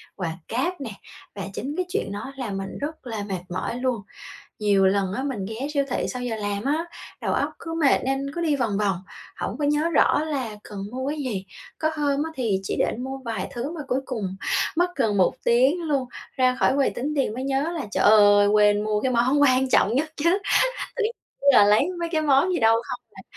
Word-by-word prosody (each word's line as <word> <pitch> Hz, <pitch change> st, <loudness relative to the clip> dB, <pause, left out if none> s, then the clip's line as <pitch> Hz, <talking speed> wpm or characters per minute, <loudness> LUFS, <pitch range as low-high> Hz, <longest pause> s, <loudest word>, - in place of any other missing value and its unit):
quà 165 Hz, -4 st, -4 dB
cáp 285 Hz, +8 st, -2 dB
nè, 255 Hz, -, -4 dB, 0.5 s
và 200 Hz, -, -5 dB
chính 275 Hz, +9 st, -4 dB
cái 365 Hz, -, 0 dB
chuyện 395 Hz, -, -2 dB
đó 205 Hz, +6 st, -5 dB
làm 210 Hz, -7 st, -3 dB
mình 195 Hz, 0 st, -5 dB
rất 305 Hz, -1 st, -5 dB
là 220 Hz, -3 st, -3 dB
mệt 190 Hz, -3 st, -3 dB
mỏi 185 Hz, +6 st, -3 dB
luôn. 250 Hz, -4 st, -1 dB, 0.6 s
Nhiều 200 Hz, -2 st, +3 dB
lần 190 Hz, -1 st, +1 dB
á, 260 Hz, -, -2 dB
mình 240 Hz, -9 st, -3 dB
ghé 230 Hz, +6 st, -4 dB
siêu 280 Hz, -1 st, +2 dB
thị -, -, -1 dB
sau 250 Hz, -1 st, -4 dB
giờ 240 Hz, -2 st, -2 dB
làm 205 Hz, 0 st, -3 dB
á, 305 Hz, +4 st, 0 dB, 0.4 s
đầu -, -, -1 dB
óc -, -, 0 dB
cứ 330 Hz, -1 st, -6 dB
mệt 280 Hz, -, +5 dB
nên 270 Hz, +1 st, -1 dB
cứ 345 Hz, -, -3 dB
đi 310 Hz, -4 st, +1 dB
vòng 225 Hz, -6 st, 0 dB
vòng, 200 Hz, -3 st, +1 dB, 0.4 s
hổng -, -, -4 dB
có 295 Hz, -, -1 dB
nhớ 295 Hz, +3 st, +2 dB
rõ 305 Hz, -2 st, +3 dB
là 265 Hz, -9 st, -3 dB
cần 205 Hz, -1 st, -8 dB
mua 260 Hz, +2 st, -3 dB
cái 305 Hz, -, -3 dB
gì. 225 Hz, -9 st, -3 dB, 0.3 s
Có 315 Hz, -, +1 dB
hôm 290 Hz, -1 st, +1 dB
á 320 Hz, -, -3 dB
thì 225 Hz, -8 st, 0 dB
chỉ 195 Hz, -, -3 dB
định 250 Hz, +3 st, -1 dB
mua 270 Hz, 0 st, -5 dB
vài 225 Hz, -5 st, -3 dB
thứ 245 Hz, +4 st, -4 dB
mà 335 Hz, -, -6 dB
cuối 255 Hz, +1 st, +1 dB
cùng 200 Hz, -8 st, -4 dB, 0.4 s
mất 355 Hz, +1 st, +1 dB
gần 225 Hz, -6 st, +1 dB
1 185 Hz, -, +3 dB
tiếng 260 Hz, +9 st, +3 dB
luôn, 280 Hz, -6 st, -1 dB, 0.3 s
ra 255 Hz, -1 st, +3 dB
khỏi -, -, +4 dB
quầy 280 Hz, -, +3 dB
tính 290 Hz, +4 st, -3 dB
tiền 270 Hz, -6 st, +1 dB
mới 255 Hz, +2 st, -4 dB
nhớ 275 Hz, +5 st, 0 dB
là, 305 Hz, -9 st, -4 dB
trời -, -, 0 dB
ơi, 205 Hz, -1 st, +7 dB
quên 210 Hz, 0 st, +4 dB
mua 210 Hz, -1 st, 0 dB
cái 260 Hz, -, 0 dB
món 255 Hz, +5 st, +3 dB
quan 260 Hz, -1 st, +4 dB
trọng 225 Hz, -3 st, +3 dB
nhất 310 Hz, +4 st, 0 dB
chứ, 340 Hz, +6 st, +2 dB, 0.6 s
tự 480 Hz, -, 0 dB
nhiên 445 Hz, -, 0 dB, 0.4 s
là 210 Hz, -5 st, +7 dB
lấy 210 Hz, -, +4 dB
mấy 335 Hz, -, -1 dB
cái 315 Hz, -, +2 dB
món 285 Hz, +5 st, +3 dB
gì 355 Hz, -, +1 dB
đâu 225 Hz, -1 st, +5 dB
không 245 Hz, -, -4 dB
à. 190 Hz, -, -11 dB
255 Hz, 230 wpm, -24 LUFS, 210-290 Hz, 0.6 s, ơi